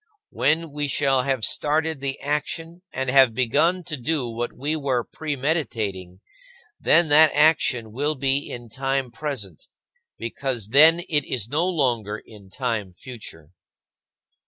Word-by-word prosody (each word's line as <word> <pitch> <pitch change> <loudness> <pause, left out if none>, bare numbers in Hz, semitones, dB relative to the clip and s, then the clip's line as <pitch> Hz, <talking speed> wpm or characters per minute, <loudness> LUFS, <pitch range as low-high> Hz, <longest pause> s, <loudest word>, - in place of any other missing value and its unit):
When 155 +5 +1
we 145 0 -2
shall 135 -1 +2
have 130 -3 0
started 155 0 0
the 135 0 -4
action 160 +4 -3
and 130 0 -3
have 130 -4 +5
begun 155 +9 +2
to 155 - -5
do 140 0 -1
what 120 +1 -4
we 145 +5 -2
were 135 -5 0
premeditating, 115 - -3 0.6
then 170 -1 +4
that 155 +2 +7
action 135 -7 +3
will 145 +6 -1
be 135 +1 0
in 120 -1 -8
time 135 +1 -2
present, 115 - -6 0.5
because 115 -2 -4
then 160 +7 +6
it 155 -5 0
is 120 -4 -2
no 160 +6 +1
longer 120 - 0
in 105 -3 -15
time 110 -3 -3
future. 90 - -11
135 Hz, 135 wpm, -23 LUFS, 115-150 Hz, 0.6 s, that